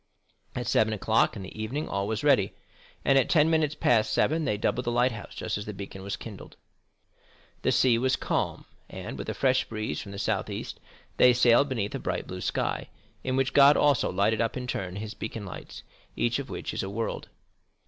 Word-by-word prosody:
At 125 -1 -3
seven 110 -1 +2
o'clock 110 +2 +2
in 100 - -6
the 100 +3 -8
evening 135 +8 -3
all 100 0 -2
was 110 -1 -2
ready, - - +3 0.5
and 135 0 +5
at 130 - 0
ten 160 -1 +4
minutes 155 -2 +2
past 115 -7 +2
seven 160 +1 +2
they 105 - 0
doubled 125 +4 -1
the 120 - 0
lighthouse 120 -3 0
just - - -3
as 100 - -7
the 105 - -5
beacon 95 -1 -8
was 100 +1 -4
kindled. 105 -4 -10 1.0
The - - +2
sea 120 -3 +4
was 130 +1 +2
calm, - - -2 0.2
and, - - -7
with 65 - -6
a - - -3
fresh 130 -1 +2
breeze 110 -8 -4
from 100 - -9
the 100 - -7
south - - -1
east, - - -6 0.4
they 125 0 +7
sailed 120 +3 +4
beneath 110 -6 -2
a - - -3
bright - - -3
blue 90 0 -7
sky, - - -2 0.3
in 130 - -1
which 135 0 +1
God 140 +1 +7
also 145 -4 +3
lighted 105 +4 +2
up 115 +2 -1
in 125 - -4
turn 95 -7 -4
his 105 +2 -5
beacon 110 -1 -6
lights, 95 - -9 0.3
each 120 +3 0
of 135 -3 -6
which - - -5
is - - -2
a 95 - -4
world. 110 +3 -4
115 Hz, 210 wpm, -27 LUFS, 100-130 Hz, 1.0 s, they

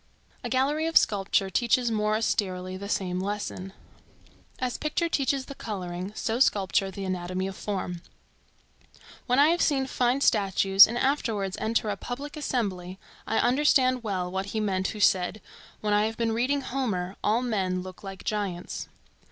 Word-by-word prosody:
A - - -3
gallery 290 +5 +1
of 330 - +4
sculpture 195 -1 +2
teaches 240 +2 +2
more 215 -1 +1
austerely 185 -4 -1
the 200 +2 -7
same 180 -3 -1
lesson. 195 -1 -4 0.9
As 255 -1 -3
picture 310 +3 0
teaches 275 -3 0
the 280 - -8
coloring, 185 -5 -5
so 225 +2 -1
sculpture 195 -5 +2
the 195 +1 -6
anatomy 185 0 -2
of 195 0 -5
form. 185 -4 -4 1.3
When 250 0 +2
I 290 +2 +6
have 340 +1 +2
seen 270 -3 +2
fine 255 +1 +1
statues 195 -3 +6
and 235 - -3
afterwards 225 -8 0
enter 220 -1 0
a 200 - -4
public 280 +8 -6
assembly, 195 -11 -2 0.3
I 225 - 0
understand 255 -1 +3
well 185 -4 -2
what 190 +1 -3
he 220 +2 -3
meant 190 -3 0
who 215 - -5
said, 190 +1 +2 0.4
"When 210 -1 0
I 210 +1 +3
have 225 - -6
been 230 -1 0
reading 255 +5 +1
Homer, 205 -9 -2
all 225 +4 +2
men 190 -6 -1
look 185 +1 -10
like 195 -1 -8
giants." 200 -5 -3
210 Hz, 160 wpm, -27 LUFS, 190-250 Hz, 1.3 s, I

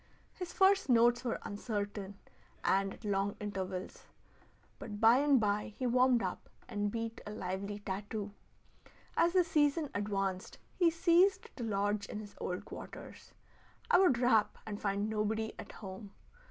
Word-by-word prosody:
His 360 -2 -6
first 385 -3 +4
notes 240 0 +5
were 240 - -1
uncertain 205 -2 -4 0.5
and 195 0 +2
at - - -14
long 200 0 0
intervals, 190 -2 -5 0.7
but 205 -1 -7
by 230 +3 +6
and 285 -2 +4
by 210 0 -1
he 255 - -2
warmed 250 0 +4
up - - -4 0.2
and 205 -3 -1
beat 230 0 -4
a - - -4
lively 200 0 -4
tattoo. 205 +1 -4 0.8
As 340 +1 +3
the 370 -1 +5
season 300 -2 +1
advanced 195 -2 -2 0.2
he 350 -3 +4
ceased 345 +3 +3
to 245 - -5
lodge 205 -1 0
in 210 - -5
his 205 -1 -9
old 180 0 -4
quarters. - - -10 0.6
I - - +7
would 360 -10 +5
rap 240 -4 +3
and 210 -1 -6
find 200 0 0
nobody 220 +1 -1
at - - -8
home. 195 0 -9
215 Hz, 150 wpm, -33 LUFS, 200-250 Hz, 0.8 s, I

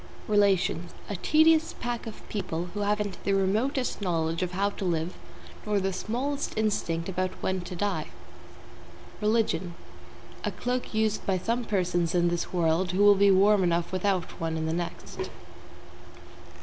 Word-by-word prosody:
=RELATIONS= 195 -4 +2 0.2
A - - -2
tedious 315 - +4
pack 240 -1 -3
of 220 - -9
people 175 -4 -3
who 205 - -4
haven't 205 -1 -1
the 200 - +1
remotest 220 +7 0
knowledge 165 -3 0
of 180 0 -2
how 200 +2 +1
to 200 - -7
live 170 -1 -1 0.5
nor 210 -1 +1
the 190 0 -1
smallest 255 +10 -2
instinct 170 -6 0
about 185 0 -1
when 190 -1 0
to 180 +1 -7
die. 205 +3 -1 1.1
=RELIGION= 210 -6 +1 0.7
A - - 0
cloak 245 -2 -3
used 220 -1 +1
by 190 -1 +2
some 230 +6 -1
persons 175 -4 0
in 175 -1 +3
this 170 0 -2
world 175 +1 +1
who 195 +2 +3
will 205 0 +8
be 200 0 +4
warm 200 +1 +5
enough 170 -1 +1
without 185 -1 0
one 165 0 -1
in 160 - -2
the 160 - -1
next. 170 0 -4
195 Hz, 155 wpm, -28 LUFS, 175-210 Hz, 1.1 s, will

